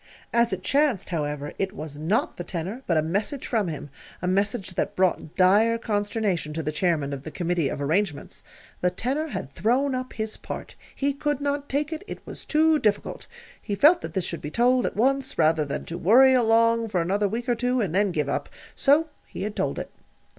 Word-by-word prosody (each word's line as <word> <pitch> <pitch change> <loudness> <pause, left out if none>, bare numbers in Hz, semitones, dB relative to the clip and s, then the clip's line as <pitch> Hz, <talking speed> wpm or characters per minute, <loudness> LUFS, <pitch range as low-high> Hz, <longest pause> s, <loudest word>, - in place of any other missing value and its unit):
As 235 0 +3
it 185 -1 -3
chanced, 275 -4 +1
however, 150 -3 -3
it 195 -1 -1
was 150 -1 -7
not 175 +9 0
the 175 - -4
tenor, 185 +8 -5
but 170 - +2
a 155 - +2
message 200 - -2
from 220 -6 0
him 150 -3 -6 0.3
a - - -4
message 195 0 0
that - - -2
brought 180 -4 0
dire 205 +5 +4
consternation 205 -7 -1
to 160 +1 -3
the 155 - -1
Chairman 155 -4 0
of 135 - -5
the 155 - -7
Committee 170 -3 -1
of - - -4
Arrangements. 155 +2 -1 0.4
The 180 - +3
tenor 275 - -2
had 140 - -6
thrown 260 +6 +1
up 255 0 -4
his 220 -1 -4
part. - - -7 0.2
He 280 0 0
could 290 0 -1
not 285 0 -2
take 295 +3 -1
it; 320 - -6
it - - -8
was - - -8
too 315 0 +3
difficult. 210 -4 -1 0.3
He 205 - -3
felt 310 - +6
that - - -7
this 185 -2 0
should 170 - -4
be 150 - -5
told 245 +6 +3
at - - -5
once 265 +4 +1
rather 155 -1 +3
than 140 - -4
to 170 +1 -6
worry 260 +8 +6
along 230 -1 +3
for 190 -4 0
another 200 +5 +1
week 235 +5 -4
or 245 - +3
two, 245 +2 0
and 195 -8 -1
then 200 0 +2
give 150 -4 -1
up. 140 - -2 0.2
So 300 +3 +3 0.2
he - - -6
had 210 0 -4
told - - -1
it. - - -5
205 Hz, 210 wpm, -25 LUFS, 170-255 Hz, 0.4 s, felt